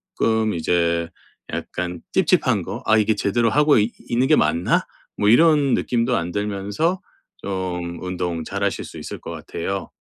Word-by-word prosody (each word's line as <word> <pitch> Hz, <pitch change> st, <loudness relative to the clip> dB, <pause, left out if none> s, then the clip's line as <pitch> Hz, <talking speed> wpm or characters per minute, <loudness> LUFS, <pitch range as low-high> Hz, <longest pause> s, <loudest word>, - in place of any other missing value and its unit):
쪼끔 110 Hz, -1 st, +1 dB
이제 85 Hz, 0 st, 0 dB, 0.4 s
약간 90 Hz, -1 st, -4 dB
찝찝한 -, -, +3 dB
거 -, -, -6 dB
'아 110 Hz, -, +4 dB
이게 110 Hz, 0 st, +2 dB
제대로 115 Hz, +3 st, +1 dB
하고 150 Hz, +5 st, +4 dB
이 105 Hz, +3 st, +1 dB, 0.2 s
있는 120 Hz, +2 st, +2 dB
게 155 Hz, -, +5 dB
맞나?' 85 Hz, -, +2 dB, 0.3 s
뭐 105 Hz, -, +1 dB
이런 145 Hz, +2 st, +5 dB
느낌도 120 Hz, -1 st, 0 dB
안 85 Hz, +1 st, -3 dB
들면서 105 Hz, -, -1 dB, 0.4 s
좀 90 Hz, -3 st, -4 dB
운동 90 Hz, -2 st, -3 dB
잘하실 -, -, -2 dB
수 -, -, -10 dB
있을 -, -, -7 dB
것 -, -, -7 dB
같아요. 95 Hz, +2 st, -5 dB
100 Hz, 280 characters per minute, -22 LUFS, 90-120 Hz, 0.4 s, 게